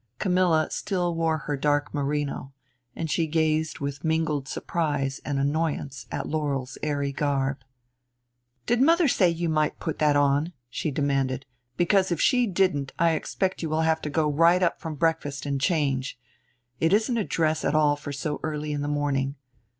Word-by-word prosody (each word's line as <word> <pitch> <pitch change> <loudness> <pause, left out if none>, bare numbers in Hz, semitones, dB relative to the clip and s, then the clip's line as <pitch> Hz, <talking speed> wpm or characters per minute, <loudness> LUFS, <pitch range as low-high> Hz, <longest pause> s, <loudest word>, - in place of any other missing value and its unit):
Camilla 180 -4 +2
still 180 -4 -1
wore 165 -1 +1
her 145 0 -3
dark 145 +1 0
merino; 145 -1 -2 0.4
and 165 - -3
she 165 -2 +1
gazed 155 0 +1
with 140 0 -5
mingled 160 -4 0
surprise 145 -5 -2
and 145 -2 -2
annoyance 145 -2 -1
at - - -3
Laurel's 140 -4 -2
airy 145 -2 -1
garb. 140 -1 -1 1.1
"Did 240 +1 +2
mother 330 +3 +5
say 190 -8 +4
you 170 0 -1
might 155 -1 0
put 160 - -4
that 150 -1 +3
on?" 145 +4 +2 0.2
she 155 - -2
demanded. 135 -2 0 0.3
"Because 185 +1 +3
if 170 - 0
she 250 +2 +3
didn't 180 -8 +1
I 170 0 +3
expect 185 +4 -2
you 160 - -2
will 155 +1 +1
have 160 0 +2
to 150 - -3
go 155 +1 +1
right 165 +5 +4
up 170 - 0
from 160 -2 -5
breakfast 145 -3 -1
and 140 -1 -2
change. 135 -5 0 0.6
It 165 +3 +2
isn't 225 +3 +2
a - - +1
dress 155 -3 0
at 150 - +1
all 150 -1 +4
for 145 0 -7
so 145 +2 -3
early 150 -1 -3
in 145 -1 -2
the 145 - -2
morning. 145 -2 0
150 Hz, 175 wpm, -26 LUFS, 140-165 Hz, 1.1 s, mother